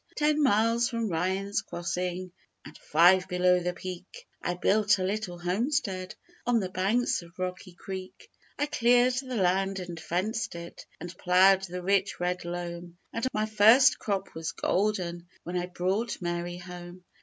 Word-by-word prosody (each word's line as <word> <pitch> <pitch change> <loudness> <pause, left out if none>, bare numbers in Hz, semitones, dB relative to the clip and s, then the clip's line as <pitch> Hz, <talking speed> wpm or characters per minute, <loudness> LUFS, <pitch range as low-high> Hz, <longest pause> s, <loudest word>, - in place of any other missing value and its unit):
Ten 300 0 +2
miles 230 -2 +3
from 230 -3 -2
Ryan's 190 +5 -1
crossing 180 +1 -4 0.3
And - - -11
five 180 +4 +4
below 180 0 +3
the 180 0 -2
peak, 185 - -8 0.2
I 175 - -2
built 210 +3 +3
a 185 - -2
little 195 -2 -3
homestead 190 - -1 0.3
On 245 -1 +3
the 190 -3 -3
banks 200 +7 +1
of 170 0 -16
Rocky 185 0 -5
Creek; 190 0 -8 0.3
I 290 - +1
cleared 245 -2 +3
the 255 -2 -6
land 195 0 +1
and 175 -3 -6
fenced 190 +7 -2
it 170 0 -9
And 175 +1 -8
ploughed 190 +2 +5
the 180 0 -5
rich 195 +1 +1
red 180 0 -2
loam, 175 0 -6 0.2
And 230 +3 -1
my 215 0 0
first 225 +5 +6
crop 200 -3 -3
was 160 0 -4
golden 180 -4 -1 0.2
When 175 - -5
I 180 0 -1
brought 185 +6 -2
Mary 175 0 -3
home. 180 0 -10
185 Hz, 155 wpm, -28 LUFS, 175-215 Hz, 0.3 s, first